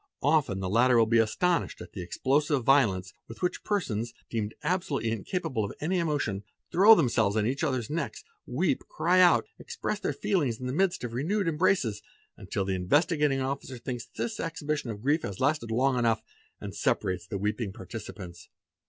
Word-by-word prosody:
Often 135 Hz, -10 st, +2 dB
the 95 Hz, -, -2 dB
latter 120 Hz, +5 st, +4 dB
will 115 Hz, -, +6 dB
be 115 Hz, +1 st, +3 dB
astonished 165 Hz, +10 st, +1 dB
at -, -, -10 dB
the 95 Hz, -, -5 dB
explosive 135 Hz, -, +1 dB
violence 105 Hz, -9 st, +3 dB
with 115 Hz, -, -10 dB
which 180 Hz, -, -1 dB
persons, 120 Hz, -, -2 dB, 0.2 s
deemed 110 Hz, -2 st, -2 dB
absolutely 160 Hz, -, 0 dB
incapable 130 Hz, -, -2 dB
of 100 Hz, -, -4 dB
any 180 Hz, +4 st, 0 dB
emotion, 145 Hz, -, -1 dB, 0.3 s
throw 205 Hz, +6 st, +8 dB
themselves 115 Hz, -, +2 dB
on 105 Hz, -, +2 dB
each 135 Hz, +7 st, -1 dB
others 130 Hz, -7 st, 0 dB
necks, 165 Hz, +3 st, -4 dB, 0.2 s
weep, -, -, 0 dB
cry 185 Hz, -, +2 dB
out, 175 Hz, -1 st, +5 dB
express 455 Hz, -, -4 dB
their 200 Hz, -, -1 dB
feelings 165 Hz, -, 0 dB
in 125 Hz, -, -6 dB
the 125 Hz, -, -2 dB
midst 185 Hz, 0 st, +1 dB
of 120 Hz, -2 st, -4 dB
renewed 175 Hz, -, 0 dB
embraces, 150 Hz, -, +1 dB, 0.3 s
until 95 Hz, -, -3 dB
the 95 Hz, -, -1 dB
Investigating 145 Hz, -, +2 dB
Officer 135 Hz, -1 st, -4 dB
thinks 120 Hz, -1 st, -5 dB
this 225 Hz, -2 st, -3 dB
exhibition 155 Hz, -5 st, -3 dB
of 105 Hz, -1 st, -6 dB
grief 150 Hz, +4 st, +2 dB
has 100 Hz, -, -5 dB
lasted 140 Hz, -3 st, +1 dB
long 125 Hz, +3 st, +2 dB
enough 115 Hz, -2 st, +1 dB, 0.4 s
and -, -, -7 dB
separates 90 Hz, -1 st, -1 dB
the 100 Hz, -, -3 dB
weeping 105 Hz, +1 st, -2 dB
participants. 95 Hz, -3 st, -9 dB
130 Hz, 175 wpm, -28 LUFS, 110-160 Hz, 0.4 s, throw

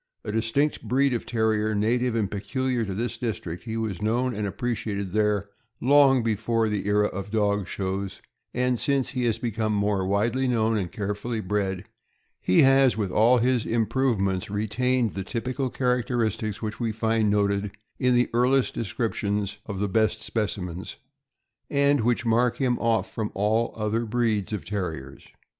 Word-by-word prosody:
A -, -, -4 dB
distinct 115 Hz, +7 st, 0 dB
breed 135 Hz, +1 st, +2 dB
of 120 Hz, -, -3 dB
Terrier, 110 Hz, -2 st, +1 dB
native 120 Hz, +3 st, +1 dB
and 105 Hz, -4 st, 0 dB
peculiar 120 Hz, +4 st, -1 dB
to 95 Hz, -2 st, -4 dB
this 115 Hz, +1 st, -3 dB
district, 100 Hz, -7 st, -4 dB
he 110 Hz, -1 st, -3 dB
was 110 Hz, -4 st, -3 dB
known 120 Hz, +4 st, +1 dB
and 105 Hz, -1 st, -2 dB
appreciated 100 Hz, -3 st, -3 dB
there 105 Hz, -1 st, +1 dB, 0.3 s
long 135 Hz, -1 st, +5 dB
before 115 Hz, 0 st, 0 dB
the 105 Hz, -1 st, -2 dB
era 105 Hz, 0 st, +3 dB
of 100 Hz, 0 st, -4 dB
dog 100 Hz, -3 st, +1 dB
shows; 95 Hz, +1 st, -3 dB, 0.3 s
and 125 Hz, -1 st, 0 dB
since 140 Hz, -2 st, +1 dB
he 125 Hz, -2 st, -2 dB
has 115 Hz, -2 st, +1 dB
become 110 Hz, -2 st, -1 dB
more 100 Hz, -1 st, +1 dB
widely 115 Hz, +7 st, +1 dB
known 115 Hz, -2 st, +2 dB
and 95 Hz, -5 st, -2 dB
carefully 105 Hz, +4 st, -3 dB
bred, 95 Hz, -2 st, -1 dB, 0.6 s
he 90 Hz, -, +4 dB
has, 135 Hz, -3 st, +5 dB
with 100 Hz, -4 st, -1 dB
all 115 Hz, +6 st, +5 dB
his 125 Hz, 0 st, +2 dB
improvements, 110 Hz, -5 st, 0 dB
retained 115 Hz, +3 st, 0 dB
the 95 Hz, -, -4 dB
typical 130 Hz, +5 st, -3 dB
characteristics 120 Hz, -4 st, -1 dB
which 110 Hz, 0 st, -4 dB
we 115 Hz, -2 st, 0 dB
find 110 Hz, 0 st, +1 dB
noted 100 Hz, 0 st, +1 dB, 0.3 s
in 125 Hz, -1 st, +3 dB
the 120 Hz, 0 st, +3 dB
earliest 125 Hz, +2 st, +2 dB
descriptions 105 Hz, -2 st, -2 dB
of 100 Hz, -3 st, -4 dB
the 100 Hz, +1 st, 0 dB
best 110 Hz, +2 st, +1 dB
specimens, 95 Hz, -5 st, -3 dB, 0.7 s
and 140 Hz, -1 st, +3 dB
which 120 Hz, +1 st, +1 dB
mark 115 Hz, +1 st, +2 dB
him 130 Hz, -3 st, +1 dB
oif 115 Hz, -1 st, +1 dB
from 110 Hz, -2 st, -4 dB
all 110 Hz, +4 st, +1 dB
other 110 Hz, +2 st, 0 dB
breeds 110 Hz, -4 st, 0 dB
of 105 Hz, -6 st, -4 dB
Terriers. 85 Hz, -9 st, -5 dB
110 Hz, 160 wpm, -25 LUFS, 100-120 Hz, 0.7 s, long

